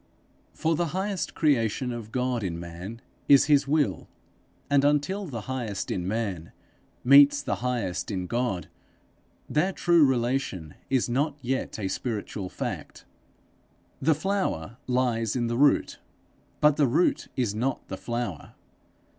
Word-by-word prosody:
For 160 +1 +1
the 170 +2 0
highest 195 0 -2
creation 125 -5 +1
of 115 -2 -7
God 125 -1 -1
in 85 -3 -3
man 90 +7 -8 0.3
is 140 -1 +7
his 145 -2 +3
will, 140 - +1 0.6
and 140 -1 +3
until 150 +8 +1
the 120 -7 -5
highest 115 -4 -4
in 90 -1 -2
man 100 -6 -3 0.5
meets 145 +2 +7
the - - -1
highest 120 -7 -2
in 95 -3 -2
God, 115 -4 -2 0.8
their 175 +6 +1
true 170 -3 +4
relation 120 - 0 0.2
is 130 -2 +2
not 140 +4 0
yet 130 +2 -2
a 100 -3 -2
spiritual 105 -2 -4
fact. - - -6 1.0
The 155 +3 +3
flower 155 - -2
lies 125 -3 0
in 120 -2 0
the 115 0 -1
root, 145 0 +3 0.6
but 150 -1 +5
the 145 - +4
root 150 +9 +1
is 120 -6 0
not 125 +5 -2
the - - -5
flower. 120 -8 -5
125 Hz, 140 wpm, -27 LUFS, 110-145 Hz, 1.0 s, is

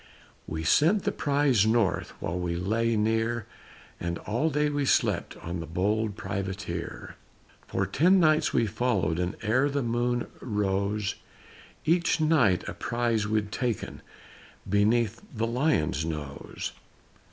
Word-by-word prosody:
We 80 0 -4
sent 165 - +4
the 205 - +1
prize 140 - +2
north 110 -3 +1
While 85 +2 -3
we 85 -1 -2
lay 110 +6 0
near 115 +1 0 0.5
And 85 0 -2
all 120 +9 -1
day 150 0 +1
we 145 -1 0
slept 135 - +1
On 85 +1 -4
the 80 - -6
bold 105 +5 0
Privateer. 95 -5 -5 0.5
For - - -1
ten 180 +6 +4
nights 155 -2 +3
we 115 - +2
followed, 100 -7 0
And 90 +2 -1
ere 130 +7 +2
the 140 -1 -1
moon 120 +1 0 0.2
rose, 105 -2 -1 0.7
Each 170 +1 +2
night 140 - +3
a - - -4
prize 115 -3 -1
we'd 105 -1 0
taken 120 -1 -3 0.7
Beneath 105 +3 +2
the 115 +1 0
Lion's 115 - +1
nose. 75 -4 -5
110 Hz, 130 wpm, -27 LUFS, 95-130 Hz, 0.7 s, sent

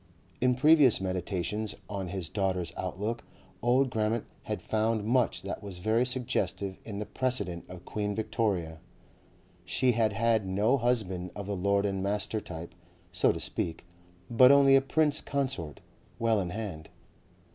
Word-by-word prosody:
In 125 0 +3
previous 145 -2 +6
meditations 95 +3 -2
on 100 -3 -4
his 90 -1 -4
daughter's 90 -2 -1
outlook 105 +5 -3 0.4
old 125 +2 +3
Grammont 110 0 0 0.2
had - - -3
found 110 0 0
much 120 +1 +1
that - - -5
was 100 -3 -7
very 110 +6 +1
suggestive 105 -6 -2
in 105 -3 -6
the 105 - -3
precedent 125 -11 -2
of 90 -1 -10
Queen 105 -1 -2
Victoria. 100 -7 -1 0.8
She 125 +7 +2
had 110 -3 +1
had 110 -1 +1
no 105 +8 +2
husband 100 -7 0
of 100 - -5
the 100 0 -3
lord 100 +2 +1
and 95 -1 -1
master 105 +2 -1
type, 85 -2 -8 0.4
so - - +3
to - - -5
speak, 85 +1 -3 0.4
but 125 +3 +7
only 140 -1 +7
a 135 - +6
Prince 150 +2 +1
Consort, 130 - -3 0.4
well 115 -2 +2
in 90 - -3
hand. 90 -6 -6
105 Hz, 150 wpm, -29 LUFS, 95-120 Hz, 0.8 s, but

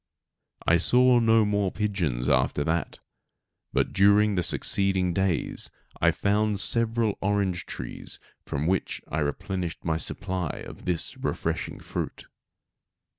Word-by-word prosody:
I 85 - +5
saw 125 +7 +5
no 115 -1 +4
more 100 -2 0
pigeons 90 - -1
after 75 - +2
that, 80 +2 -2 0.7
but - - 0
during 100 +2 +4
the 90 - +1
succeeding 95 0 +3
days 95 -4 0 0.3
I - - +5
found 105 0 +1
several 115 0 +1
orange 95 -3 0
trees - - -6 0.3
from 70 - -3
which 95 +2 -1
I 80 - -1
replenished 85 +4 -3
my 80 -1 +1
supply 90 0 -3
of - - -11
this 90 -3 -1
refreshing - - -3
fruit. - - -5
95 Hz, 125 wpm, -26 LUFS, 85-105 Hz, 0.7 s, I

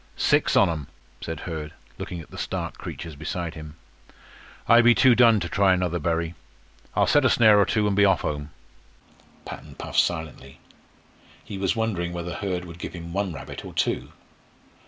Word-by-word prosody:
"Six - - +2
on - - +6
'em," 80 -5 -4 0.3
said 80 -2 -5
Hurd, 80 -3 -6 0.3
looking 85 -2 -5
at - - -15
the - - -10
stark - - -4
creatures 80 -3 -7
beside 80 +2 -4
him. 75 -1 -10 0.9
"I 115 +1 +7
be 120 0 +6
too 130 -2 +6
done 115 -3 +5
to 85 - -2
try 95 0 +3
another 90 -1 -1
bury. 85 +1 -1 0.6
I'll - - +4
set 145 - +4
a 130 - +4
snare 110 -4 +6
or 100 - +4
two, 110 -2 +1
an' 105 - +1
be 100 +1 +4
off 100 -1 +4
home." 75 0 -3 1.0
Patton - - -9
puffed - - -1
silently. 80 -5 -2 0.9
He 100 - -7
was 95 -1 0
wondering 95 -7 -1
whether 85 0 -4
Hurd 90 -3 -3
would 85 0 -11
give - - -6
him 85 -1 -8
one 100 -1 -1
rabbit 80 - -8
or - - -10
two. - - -1
85 Hz, 180 wpm, -25 LUFS, 80-100 Hz, 1.0 s, I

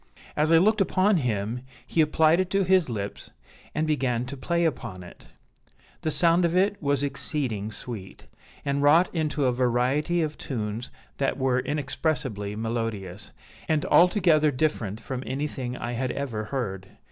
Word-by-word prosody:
As 155 +2 +2
I 165 - +7
looked 215 +5 +4
upon 195 +1 +3
him, 115 -3 -1 0.2
he 165 - +1
applied 155 +2 +4
it 185 -1 0
to 195 +1 +2
his 185 -4 +3
lips, 100 -3 -5 0.5
and 155 +1 +1
began 130 -6 0
to 135 +3 -6
play 170 +5 0
upon 110 - -3
it. 90 - -14 0.7
The 160 - -1
sound 170 +2 +3
of 170 0 +1
it 200 +2 +2
was 140 -2 +1
exceeding 135 -7 -2
sweet, 110 -5 -8 0.4
and 140 0 0
wrought 160 +5 +5
into 155 -4 0
a 125 - +3
variety 130 +7 +1
of 155 -1 -4
tunes 110 -2 -4 0.3
that - - 0
were 130 -1 +1
inexpressibly 130 -7 -2
melodious, 110 -4 -4 0.4
and 155 -2 +1
altogether 170 -4 +4
different 125 -7 -1
from 130 +1 -5
anything 130 -2 -4
I 120 - -4
had 125 +2 -2
ever 115 -7 -3
heard. 100 -7 -4
140 Hz, 155 wpm, -26 LUFS, 115-160 Hz, 0.7 s, I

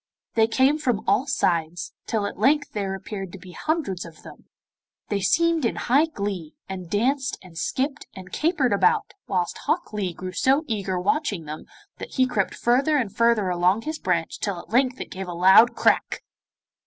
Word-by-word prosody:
They 220 -1 +4
came 265 +6 +3
from 245 -8 0
all 270 - +2
sides, 175 -9 -1
till 215 -3 0
at 200 - -6
length 290 +6 +2
there 195 -2 -2
appeared 195 -1 -6
to - - -7
be 185 -1 -12
hundreds 290 - -2
of 165 -2 -13
them. - - -13 0.6
They 205 -1 -1
seemed 330 - +2
in 230 - 0
high 285 +6 +3
glee, 200 - -5
and 185 -3 -7
danced 260 +7 0
and 180 -3 -15
skipped 275 - -2
and 185 -1 -10
capered 300 - +1
about, 420 - +2
whilst 180 -3 -1
Hok 345 -8 -1
Lee 200 -4 -1
grew 185 0 -6
so 270 - +2
eager 195 -6 -2
watching 205 - -1
them 155 +1 -7 0.3
that - - -8
he 260 - +4
crept 210 -6 -1
further 275 +6 +2
and 230 -8 -2
further 230 -4 +3
along 180 +5 +2
his 310 0 -4
branch 170 -3 -1
till 200 -3 -2
at - - -13
length 255 +1 +2
it - - -7
gave 190 0 -6
a 175 - -5
loud 190 +7 +6
crack. - - +1
210 Hz, 185 wpm, -24 LUFS, 185-270 Hz, 0.6 s, loud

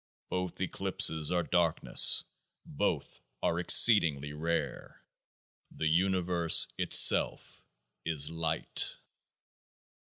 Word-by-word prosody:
Both 90 -1 -6
eclipses 80 -2 -1
are 90 -1 -2
darkness; 85 -1 +2 0.4
both - - -5 0.2
are 85 - -2
exceed 105 +4 +5
ing 75 -2 -6
rare; 85 +2 -7 0.6
the 80 - -8
Universe 85 0 +1
itself - - +2 0.4
is 80 -2 -1
Light. 80 - -3
85 Hz, 85 wpm, -28 LUFS, 80-90 Hz, 0.6 s, exceed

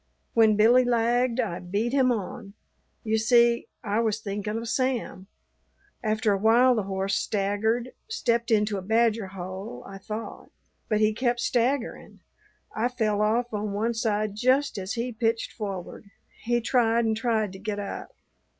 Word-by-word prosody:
When 220 -2 +5
Billy 235 +4 +5
lagged 240 +1 +1
I 205 -8 -1
beat 205 +7 -2
him 260 -2 +4
on. 200 -2 -5 0.5
You 220 0 +1
see, 235 +1 +3 0.2
I 210 0 0
was 220 -2 0
thinking 210 +1 -4
of 230 +1 -5
Sam. 250 -6 -2 0.8
After 215 0 +1
a 195 - -1
while 235 +5 +5
the 225 - 0
horse 195 0 -1
staggered, 220 +6 0 0.2
stepped 235 - 0
into 210 -2 +2
a - - -7
badger 220 +1 +1
hole, 190 +3 -7
I 195 0 -9
thought. 215 +3 -7 0.4
But 215 0 +1
he 215 0 +3
kept 240 +1 0
staggerin'. 245 +2 -1 0.5
I 225 +3 +1
fell 220 -4 0
off 230 +3 +1
on 210 -1 -2
one 225 +4 0
side 215 -2 -1
just 255 +3 +1
as 190 +1 -4
he 245 +1 -2
pitched 225 0 -1
forward. 200 -1 -6 0.4
He 240 +1 +1
tried 230 -1 +2
and 220 -1 +1
tried 220 -3 0
to 190 - -10
get 205 +1 -4
up. 200 -1 -6
220 Hz, 160 wpm, -26 LUFS, 205-240 Hz, 0.8 s, When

